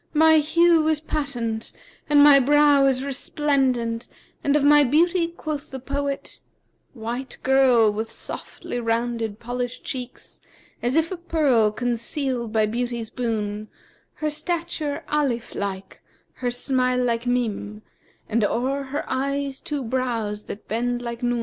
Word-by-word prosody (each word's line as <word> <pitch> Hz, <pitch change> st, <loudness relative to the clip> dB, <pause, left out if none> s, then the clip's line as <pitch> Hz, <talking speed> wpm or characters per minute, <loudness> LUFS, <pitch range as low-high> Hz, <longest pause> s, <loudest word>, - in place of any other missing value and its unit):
My 315 Hz, +1 st, +6 dB
hue 325 Hz, +1 st, +4 dB
is 315 Hz, -1 st, +2 dB
patent 245 Hz, -8 st, -3 dB, 0.4 s
and 290 Hz, -1 st, +7 dB
my 290 Hz, -1 st, +8 dB
brow 290 Hz, +1 st, +5 dB
is 265 Hz, -1 st, +1 dB
resplendent 265 Hz, -4 st, 0 dB, 0.4 s
and 285 Hz, 0 st, +2 dB
of 295 Hz, -, +3 dB
my 295 Hz, 0 st, +7 dB
beauty 335 Hz, +6 st, +3 dB
quoth 310 Hz, -3 st, -5 dB
the 265 Hz, -, -6 dB
poet,' 280 Hz, +1 st, -4 dB, 0.5 s
'White 240 Hz, +3 st, -5 dB
girl 255 Hz, -5 st, +5 dB
with 220 Hz, +2 st, -4 dB
softly 245 Hz, -, -6 dB
rounded 230 Hz, -2 st, -1 dB
polished 245 Hz, +1 st, -4 dB
cheeks 250 Hz, -2 st, -7 dB, 0.2 s
* -, -, -32 dB
As 245 Hz, +3 st, 0 dB
if 325 Hz, +2 st, +2 dB
a 370 Hz, -, -3 dB
pearl 295 Hz, -10 st, +2 dB
concealed 240 Hz, +1 st, -2 dB
by 220 Hz, -1 st, +3 dB
Beauty's 235 Hz, 0 st, -3 dB
boon: 215 Hz, -3 st, -2 dB, 0.5 s
Her 305 Hz, -1 st, -2 dB
stature 320 Hz, -1 st, -3 dB
Alif 275 Hz, -6 st, -1 dB
like;[FN#354] 195 Hz, -1 st, -5 dB, 0.4 s
her 250 Hz, -, +1 dB
smile 250 Hz, 0 st, 0 dB
like 235 Hz, -1 st, 0 dB
Mнm[FN#355] 220 Hz, -4 st, -1 dB, 0.2 s
* -, -, -36 dB
And 225 Hz, 0 st, +1 dB
o'er 260 Hz, +6 st, 0 dB
her 280 Hz, +2 st, -3 dB
eyes 275 Hz, 0 st, -2 dB
two 290 Hz, -3 st, -3 dB
brows 230 Hz, -4 st, -2 dB
that 205 Hz, -, -8 dB
bend 245 Hz, +2 st, -1 dB
like 235 Hz, 0 st, -5 dB
Nъn. 245 Hz, -1 st, 0 dB
255 Hz, 145 wpm, -24 LUFS, 235-290 Hz, 0.5 s, my